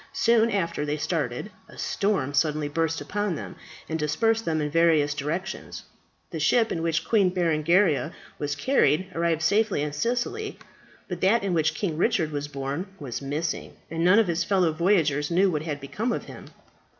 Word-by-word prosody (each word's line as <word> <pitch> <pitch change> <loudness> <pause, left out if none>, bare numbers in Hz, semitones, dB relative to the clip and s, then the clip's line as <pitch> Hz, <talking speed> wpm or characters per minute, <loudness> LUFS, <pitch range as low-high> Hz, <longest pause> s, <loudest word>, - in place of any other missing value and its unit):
Soon 230 -1 +3
after 170 -7 -1
they 150 0 -2
started, 150 - -2 0.2
a - - -14
storm 190 -9 -1
suddenly 150 +1 +1
burst 160 +2 -1
upon 205 -3 -2
them, - - -7 0.3
and 160 0 -3
dispersed 225 +10 +1
them 160 -1 0
in 150 -1 -2
various 160 -3 +3
directions. 155 +6 -4 0.5
The - - -4
ship 230 -2 +3
in 165 - -2
which 165 0 0
Queen 205 -5 +4
Berengaria 170 -2 +2 0.3
was 145 -1 -2
carried, 185 - +2
arrived 165 -1 0
safely 205 -3 +2
in 150 -1 -3
Sicily; 245 - -2 0.5
but - - -5
that 205 +4 +3
in 195 -2 0
which 160 -2 +1
King 170 -7 -2
Richard 170 -6 +1
was 145 0 -3
borne 140 +5 -4
was 135 -3 -5
missing, 150 +4 -3 0.2
and 165 0 -1
none 185 +4 +6
of 225 -3 +4
his 170 0 0
fellow 180 -2 +2
voyagers 155 -4 +2
knew 185 +3 +3
what 150 -3 -1
had 150 -2 -4
become 205 - -3
of - - -2
him. - - -11
165 Hz, 175 wpm, -26 LUFS, 150-195 Hz, 0.5 s, none